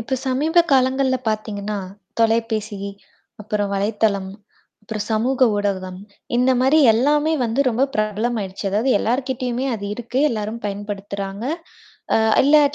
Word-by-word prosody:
இப்போ 265 +4 -2
சமீப 300 +6 +1
காலங்கள்ல 260 0 +3
பாத்திங்கன்னா 210 -1 -3 0.4
தொலைபேசி, 225 -2 +1 0.6
அப்புறம் 210 -1 -2
வலைத்தளம், 200 -1 0 0.5
அப்புறம் 210 0 -5
சமூக 250 +3 +3
ஊடகம் 190 -3 -2 0.4
இந்த 250 +2 +3
மாதிரி 265 +5 +4
எல்லாமே 295 +7 +2
வந்து 230 +4 0
ரொம்ப 245 +4 +2
பிரபலமாயிடுச்சு. 215 -2 -2
அதாவது 220 +7 +1
எல்லார்கிட்டேயுமே 255 +1 -1
அது 205 -2 -6
இருக்கு, 240 +2 -4
எல்லாரும் 220 0 -4
பயன்படுத்துறாங்க. 200 0 -5 0.7
அ - - +5 0.3
எல்லா 300 +2 +6
225 Hz, 115 wpm, -21 LUFS, 205-255 Hz, 0.7 s, எல்லா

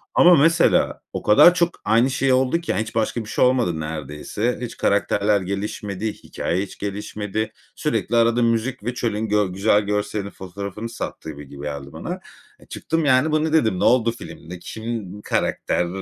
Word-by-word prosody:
ama 175 0 +7
mesela 165 +3 +3
o - - -3
kadar 105 +11 +7
çok 175 -1 +2 0.2
aynı 115 +4 +4
şey 130 0 +2
oldu 130 +6 +2
ki, 165 - -2
yani, - - 0
hiç 110 - -6
başka 115 +1 0
bir - - -10
şey - - +3
olmadı 120 -11 +1
neredeyse. 75 - -3
Hiç 120 - -6
karakterler 100 0 +2
gelişmedi, 100 +2 -3
hikâye 90 +3 -3
hiç 100 - -10
gelişmedi. 105 +1 -4 0.2
Sürekli, 120 - -1
arada 115 +1 +3
müzik 115 +1 0
ve 120 +3 -2
çölün 110 -2 -2
gö 105 0 +3
güzel 105 +2 +3
görselinin 105 0 -2
fotoğrafını 100 +4 -7
sattı 105 -8 -6
gibi 70 -1 -11
geldi 70 -1 -6
bana. - - -5 0.5
Çıktım, 165 -1 -2
yani, 140 +3 +4
"Bu 155 0 +2
ne?" 160 - -2
dedim. 110 - +2
Ne - - 0
oldu 120 -2 +4
filmde? 90 -5 -10
Kim 110 -2 -6
karakter? 90 -3 0
110 Hz, 170 wpm, -22 LUFS, 100-125 Hz, 0.5 s, ama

